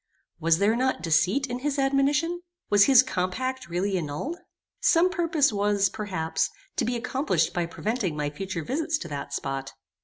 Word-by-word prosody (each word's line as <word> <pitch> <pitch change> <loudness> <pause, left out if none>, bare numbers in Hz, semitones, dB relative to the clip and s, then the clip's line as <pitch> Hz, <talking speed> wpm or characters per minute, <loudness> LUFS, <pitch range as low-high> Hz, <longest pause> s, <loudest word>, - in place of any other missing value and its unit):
Was 165 0 +3
there 205 +4 +3
not 255 -8 0
deceit 180 - +2
in 245 -2 -4
his 290 +2 -2
admonition? 285 +5 +1 0.3
Was 205 -1 +7
his 260 -3 +7
compact 255 +3 -3
really 185 +2 0
annulled? 170 - -4 0.4
Some 365 -7 +4
purpose 330 - +2
was, 200 -1 +2
perhaps, 185 -7 -2 0.3
to 245 - +1
be 245 +2 -1
accomplished 260 +4 0
by 175 -1 -1
preventing 200 -2 -2
my 145 -1 -2
future 185 +1 -5
visits 310 - -1
to 175 - -7
that 145 -1 -5
spot. 135 0 -4
220 Hz, 160 wpm, -26 LUFS, 175-275 Hz, 0.4 s, Was